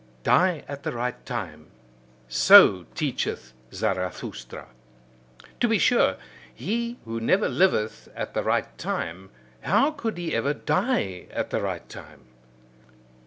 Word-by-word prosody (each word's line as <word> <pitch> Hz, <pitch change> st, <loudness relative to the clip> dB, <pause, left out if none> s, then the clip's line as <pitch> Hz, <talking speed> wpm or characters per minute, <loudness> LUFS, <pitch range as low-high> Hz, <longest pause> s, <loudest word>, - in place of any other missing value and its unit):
Die 180 Hz, -5 st, +3 dB
at 140 Hz, 0 st, -7 dB
the 160 Hz, +2 st, -3 dB
right 125 Hz, +1 st, -4 dB
time: -, -, -6 dB, 0.6 s
so 65 Hz, -, +7 dB
teacheth 65 Hz, 0 st, -3 dB, 0.2 s
Zarathustra. 60 Hz, 0 st, -4 dB, 0.9 s
To 240 Hz, -, +3 dB
be 225 Hz, -1 st, +3 dB
sure, 245 Hz, +3 st, +3 dB, 0.3 s
he 235 Hz, +2 st, -3 dB
who 115 Hz, 0 st, -4 dB
never 185 Hz, -, +2 dB
liveth 140 Hz, -, +1 dB
at -, -, -5 dB
the -, -, 0 dB
right -, -, -1 dB
time, 90 Hz, +3 st, -4 dB, 0.3 s
how 225 Hz, -, +3 dB
could 230 Hz, -, -4 dB
he 175 Hz, -2 st, -3 dB
ever 145 Hz, +1 st, 0 dB
die 95 Hz, -, -1 dB
at -, -, -4 dB
the -, -, -1 dB
right -, -, -4 dB
time? 65 Hz, -, -13 dB
155 Hz, 125 wpm, -25 LUFS, -, 0.9 s, so